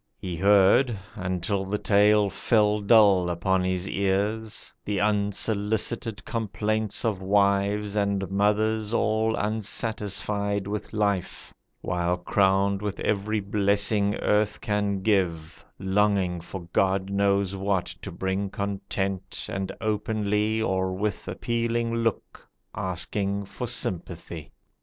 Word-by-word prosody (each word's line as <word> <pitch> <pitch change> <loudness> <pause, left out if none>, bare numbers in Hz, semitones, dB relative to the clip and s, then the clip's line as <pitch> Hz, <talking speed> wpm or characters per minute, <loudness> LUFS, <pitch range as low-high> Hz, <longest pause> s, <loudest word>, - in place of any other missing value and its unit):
He 90 -2 -5
heard 100 +6 +4 0.2
(Until 95 +1 -2
the 100 +2 -2
tale 105 0 +4
fell 105 -2 +2
dull 100 -4 +5
upon 90 +2 0
his 95 0 -1
ears) 100 +3 -1
The 105 -1 -2
unsolicited 105 +2 0
complaints 110 0 -2
of 105 -4 -1
wives 100 +1 +1
And 100 -2 0
mothers 105 +2 +1
all 110 0 +1
unsatisfied 105 -1 -1
with 105 +1 -4
life, 100 -4 -2 0.3
While 90 0 -1
crowned 95 +2 +2
with 105 -1 -4
every 105 +1 0
blessing 100 +1 +1
earth 105 0 +1
can 100 -2 -1
give 85 -6 0
Longing 95 -2 +1
for 95 +2 -7
God 95 0 +1
knows 100 -1 +1
what 95 -2 0 0.2
to 100 - -7
bring 95 +3 -2
content, 100 -1 -3
And 95 -1 -3
openly 110 0 0
or 95 -2 0
with 105 +2 -3
appealing 115 0 -1
look 115 -2 -3 0.2
Asking 100 +3 -2
for 100 +5 -6
sympathy. 85 - -4
100 Hz, 110 wpm, -26 LUFS, 95-105 Hz, 0.3 s, dull